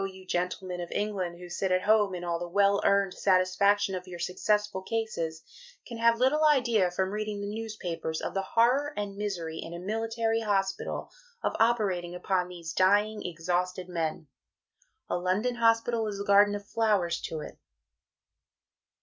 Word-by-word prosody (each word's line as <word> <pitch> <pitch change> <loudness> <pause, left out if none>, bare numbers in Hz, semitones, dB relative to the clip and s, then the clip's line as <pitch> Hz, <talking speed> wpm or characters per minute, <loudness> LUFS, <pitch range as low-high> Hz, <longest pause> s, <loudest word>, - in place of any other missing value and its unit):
you 190 -1 -12
Gentlemen 180 0 -2
of 175 - -6
England 195 -5 -2
who 180 0 -10
sit 185 +2 -2
at 185 0 +2
Home 210 -3 +3
in 175 - -6
all 170 -1 -1
the 175 - -4
well 200 +2 +3
earned 200 -2 +3
satisfaction 195 +1 +2
of 185 0 -5
your 180 -1 -7
successful 205 +3 0
cases, 190 -7 -3 0.4
can 235 -2 -8
have 230 0 +4
little 265 +6 +3
Idea 240 -10 +4
from 190 +2 -1
reading 210 0 -3
the 200 +1 -4
newspapers 185 -8 -4
of - - -4
the 195 - 0
Horror 250 +8 +2
and 205 -1 -3
Misery 175 -6 -4
(in 165 +1 -6
a - - -6
Military 225 +3 -1
Hospital) 195 -3 -1 0.3
of - - 0
operating 195 -7 +1
upon 180 0 0
these 170 -2 -7
dying, 205 +4 +3
exhausted 180 +2 -2
men. 165 -3 -3 0.8
A - - -1
London 190 +7 0
Hospital 230 0 +2
is 200 -1 -4
a - - -2
Garden 205 +1 +5
of 205 0 -7
Flowers 205 -7 +1
to 155 - -4
it. - - -10
195 Hz, 165 wpm, -28 LUFS, 180-215 Hz, 0.8 s, Garden